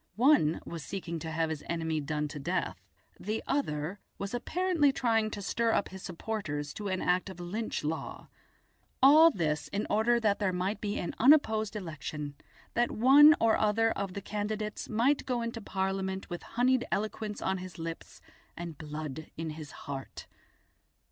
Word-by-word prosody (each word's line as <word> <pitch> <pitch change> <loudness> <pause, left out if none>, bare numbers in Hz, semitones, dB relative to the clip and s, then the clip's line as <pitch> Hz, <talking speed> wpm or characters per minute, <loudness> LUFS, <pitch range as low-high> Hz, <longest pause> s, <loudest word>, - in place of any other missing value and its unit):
One 230 - +4
was 165 -1 -6
seeking 170 -3 -5
to 160 - -5
have 160 0 0
his 155 -2 -5
enemy 160 -2 -1
done 150 +1 -2
to 150 - -7
death, 135 - -2 0.4
the 215 +3 -3
other 180 - -1 0.2
was 200 +2 -5
apparently 330 +3 +2
trying 225 -4 +1
to 205 -1 -6
stir 230 +3 +1
up - - +1
his 190 0 -9
supporters 165 -6 -4
to 210 - -5
an 185 -1 -1
act 180 +2 +1
of 190 - -10
"Lynch 205 +6 -3
law". 160 +2 -4 0.8
All 310 +4 +9
this 155 - -1
in 205 +2 -2
order 230 +3 +3
that 210 -3 +1
there 200 -3 +1
might 185 +4 -2
be 205 -1 -2
an 175 - -3
unopposed 220 -6 +4
election, 155 -5 -5 0.4
that 240 +1 +2
one 285 +6 +8
or 225 -1 +4
other 225 +1 +3
of 195 -3 -3
the 200 - -4
candidates 210 +1 -3
might 245 +6 +2
go 245 -2 0
into 230 0 -4
Parliament 190 -1 -2
with 175 - -4
honeyed 250 +1 +1
eloquence 210 +1 -2
on 190 0 -1
his 180 -2 -8
lips 165 0 -7 0.4
and 170 -4 -6
blood 155 -1 -6
on 160 0 -3
his 155 -1 -8 0.2
heart. 135 -2 -6
200 Hz, 170 wpm, -30 LUFS, 165-225 Hz, 0.8 s, All